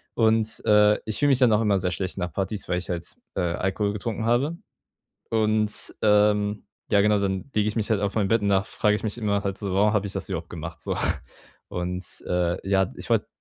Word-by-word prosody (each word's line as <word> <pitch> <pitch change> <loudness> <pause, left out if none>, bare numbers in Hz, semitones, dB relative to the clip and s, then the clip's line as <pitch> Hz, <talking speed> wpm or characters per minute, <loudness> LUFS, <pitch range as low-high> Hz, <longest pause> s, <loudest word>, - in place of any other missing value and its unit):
Und, 110 -1 +2
äh, 105 0 +5
ich 110 - -1
fühle 145 - +3
mich 135 -1 +4
dann 125 -3 +5
auch 105 - +4
immer 105 -3 +3
sehr 90 0 -1
schlecht 95 0 -3
nach 90 -2 -3
Partys, 100 +1 -3
weil 90 - +1
ich 90 - -6
halt, 85 -1 -5 0.2
äh, 95 - 0
Alkohol 95 +4 0
getrunken 110 +1 -3
habe. 135 +8 +1 0.7
Und, 110 -1 0
ähm 105 0 +3 0.3
ja 100 - +5
genau, 105 0 +3
dann 95 +5 -2
lege 105 0 +2
ich 105 - -6
mich 110 - -1
halt 105 - +2
auf 100 +1 -1
mein 105 -3 +2
Bett 115 -1 +3
und 100 - +1
dann 95 0 +2
frage 105 0 +1
ich 105 - -5
mich 110 +2 -2
immer 100 -3 0
halt 100 -1 -2
so: 100 -3 -3
„Warum 105 +3 +3
habe 105 -1 +1
ich 95 - -5
das 95 - -4
überhaupt 85 -3 -4
gemacht 85 0 -7
so.“ - - -2 0.7
Und, 90 +1 -3 0.2
äh, 90 -1 +1
ja, 95 -1 +2
ich - - -9
wollte - - +2
105 Hz, 230 wpm, -25 LUFS, 95-110 Hz, 0.7 s, äh